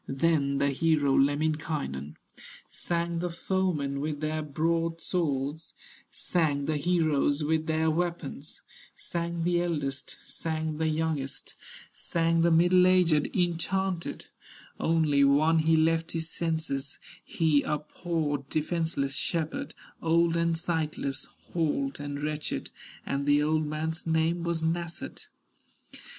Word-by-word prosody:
Then 140 -1 +1
the 140 0 +2
hero, 150 -1 +2
Lemminkainen, 145 - 0 0.6
Sang 170 0 -1
the 175 +1 -1
foemen 170 -6 -1
with 150 0 -2
their 155 +1 -1
broadswords, 160 -1 -1 0.3
Sang 150 -5 0
the 155 0 0
heroes 155 -2 +2
with 160 +1 0
their 160 0 +2
weapons, 165 -4 -3 0.3
Sang 170 -1 -3
the 175 0 +2
eldest, 145 -6 -3
sang 160 -1 -3
the 160 - +1
youngest, 155 -3 -2 0.4
Sang 165 0 +1
the 170 - +4
middle 175 +2 +5
aged, 175 -5 +4
enchanted; 180 +1 -1 0.5
Only 155 -4 +3
one 155 +4 +4
he 160 +1 +4
left 165 +1 +2
his 165 0 -2
senses, 160 -5 -2 0.3
He 155 -3 +2
a 150 - -1
poor, 150 -2 -2
defenseless 155 -3 -1
shepherd, 160 +2 -2 0.3
Old 170 0 +3
and 170 0 +2
sightless, 155 -4 -2 0.3
halt 145 -5 0
and 145 0 -5
wretched, 150 - -3 0.3
And 140 +1 -2
the 145 0 +4
old 155 0 +1
man's 160 +2 -3
name 160 +1 +2
was 170 -1 -1
Nasshut. 170 +1 -3
160 Hz, 115 wpm, -28 LUFS, 145-170 Hz, 0.6 s, middle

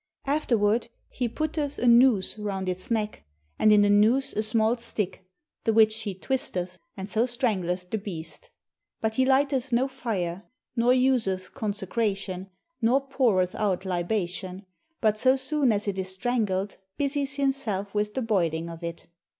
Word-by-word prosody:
Afterward 235 -6 +1 0.2
he 245 -2 -2
putteth 300 +2 -2
a - - -1
noose 235 -4 +5
round 195 -3 -3
its 185 +5 -2
neck, 215 - -2 0.4
and 215 - +5
in 210 -1 +6
the 205 - +3
noose 220 +6 +3
a 215 - 0
small 220 +1 +2
stick, 210 -5 -4 0.4
the 225 - +2
which 220 0 +4
he 205 -4 -4
twisteth, 185 -7 -3 0.2
and 190 0 -5
so 225 +4 +1
strangleth 185 -7 -1
the 220 - 0
beast. 165 -6 -6 0.5
But 220 0 -2
he 260 0 +3
lighteth 270 -1 +2
no 245 +3 +2
fire, 205 -8 -4 0.3
nor 240 +1 +3
useth 245 -8 +1
consecration, 195 -2 -2 0.3
nor 255 +4 +3
poureth 205 -10 +2
out 195 -3 -1
libation; 185 +1 -2 0.4
but 215 -1 +2
so 260 +2 +5
soon 270 -1 +2
as 205 0 -1
it 195 -1 -1
is 190 0 -2
strangled 200 -2 -1 0.2
busies 280 -1 -1
himself 250 -8 -1
with 210 0 -1
the 260 - -1
boiling 170 -6 0
of 165 +1 -10
it. 170 0 -6
215 Hz, 155 wpm, -26 LUFS, 190-250 Hz, 0.5 s, in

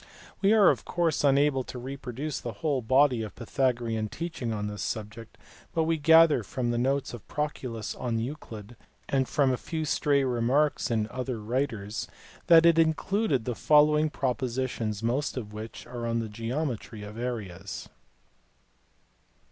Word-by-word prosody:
We 200 +1 +4
are 210 -4 +7
of - - -4
course 170 -4 0
unable 140 -1 +3
to - - -8
reproduce 135 +3 -5
the 120 - -5
whole 140 +3 -1
body 130 +1 +3
of 110 - -6
Pythagorean 120 -3 -1
teaching 165 -7 -4
on 105 -1 -2
this 105 0 -5
subject, 110 0 -5 0.4
but 165 - +3
we 160 0 0
gather 160 -2 +6
from 120 +3 -2
the 120 - 0
notes 135 +2 0
of 120 - -10
Proclus 130 -7 -3
on 120 -2 -2
Euclid 115 -3 -6 0.3
and 135 -2 0
from 140 -3 +2
a 130 - 0
few 160 +2 -4
stray 145 -1 +2
remarks 130 +4 +1
in 110 -2 0
other 125 -2 -3
writers 110 -2 -2 0.4
that 165 -1 +8
it 165 -1 +6
included 160 - +1
the 125 - -1
following 150 +4 +4
propositions, 125 -5 -2
most 130 +5 -1
of 105 -4 -5
which 110 +1 -8
are 120 -1 -5
on 115 0 0
the 115 -1 -2
geometry 115 -1 -4
of 105 +2 -8
areas. 100 -6 -5
125 Hz, 155 wpm, -28 LUFS, 115-150 Hz, 0.4 s, that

